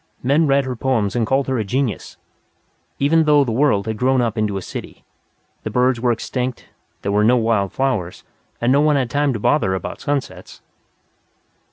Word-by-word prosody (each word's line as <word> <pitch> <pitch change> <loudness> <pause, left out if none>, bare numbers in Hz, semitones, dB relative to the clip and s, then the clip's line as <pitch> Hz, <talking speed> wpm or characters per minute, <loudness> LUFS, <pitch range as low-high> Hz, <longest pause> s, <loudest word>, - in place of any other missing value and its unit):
Men 145 +5 +3
read 140 0 +2
her 130 -1 -4
poems 115 -5 -1
and 115 -3 0
called 135 +2 +1
her 130 -2 -1
a - - 0
genius. 125 +3 -3 0.8
Even 160 +3 +3
though 150 -1 +5
the 125 - -3
whole 110 - -2
world 105 -9 +2
had 110 -1 -3
grown 130 +1 +2
up 115 -3 0
into 105 -3 -1
a - - -4
city, - - -8 0.6
the - - -4
birds 125 -1 +1
were 125 -1 +2
extinct, 125 +2 -4 0.4
there 100 - -1
were 105 +1 +2
no 120 +3 +4
wild 110 -4 +1
flowers, 125 -10 -2 0.4
and 120 +1 +1
no 140 +2 +4
one 150 -1 +3
had 130 -4 -1
time 145 0 +1
to 110 - -4
bother 100 -5 +1
about 95 - -6
sunsets. 140 -2 -4
125 Hz, 195 wpm, -20 LUFS, 110-140 Hz, 0.8 s, though